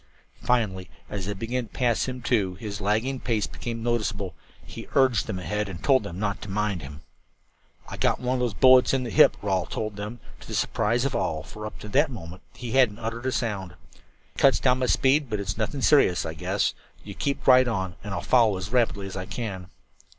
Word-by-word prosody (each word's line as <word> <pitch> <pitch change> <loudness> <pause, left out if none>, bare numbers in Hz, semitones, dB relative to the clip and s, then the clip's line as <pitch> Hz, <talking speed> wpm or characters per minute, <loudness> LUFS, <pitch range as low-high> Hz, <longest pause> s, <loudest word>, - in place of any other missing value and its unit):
Finally, 105 -7 0 0.2
as 100 -2 -4
they 100 - -2
began 115 +4 -3
to - - -29
pass 120 -3 +2
him, 125 -1 -5
too, 100 -8 +1
and - - -14
his 105 -2 -5
lagging 110 +7 0
pace 115 -5 0
became 115 -1 -6
noticeable, 105 -6 -1 0.3
he - - -9
urged 130 -6 +3
them 95 - -3
ahead 105 +2 -2
and 90 -1 -8
told 135 -2 +4
them 85 - -7
not 100 0 -2
to 105 - -7
mind 100 -2 -1
him. 70 +2 -9 0.9
"I - - -7
got - - +1
one 125 +1 -1
of - - -3
those 120 -5 -1
bullets 130 0 +6
in 130 - 0
the 120 - -5
hip," - - +6
Rawle 95 -3 0
told 110 -2 -4
them, 105 +4 -6 0.2
to - - -13
the - - -4
surprise 120 +4 +1
of 140 - -1
all, 80 -1 -1
for 105 0 -8
up - - -10
to - - -7
that 145 +8 +3
moment 90 -7 -9
he 120 -2 -6
hadn't 125 -5 +3
uttered 115 +2 -4
a - - +1
sound. 100 -8 -2 0.2
"It - - -16
cuts 135 - +5
down 125 -1 +2
my 130 - 0
speed, 135 +2 +3
but 105 -2 -2
it's 100 -1 -3
nothing 130 +5 -2
serious, 115 - +4
I 80 - -4
guess. 80 - -1 0.3
You - - -8
keep 140 -1 -3
right 130 -1 +7
on 95 -6 -2
and 105 - -6
I'll 90 -3 -2
follow 115 -1 +3
as 95 +3 -6
rapidly 115 -5 +1
as 95 - -7
I 95 -1 -5
can." 95 -6 -5
110 Hz, 225 wpm, -26 LUFS, 95-125 Hz, 0.9 s, right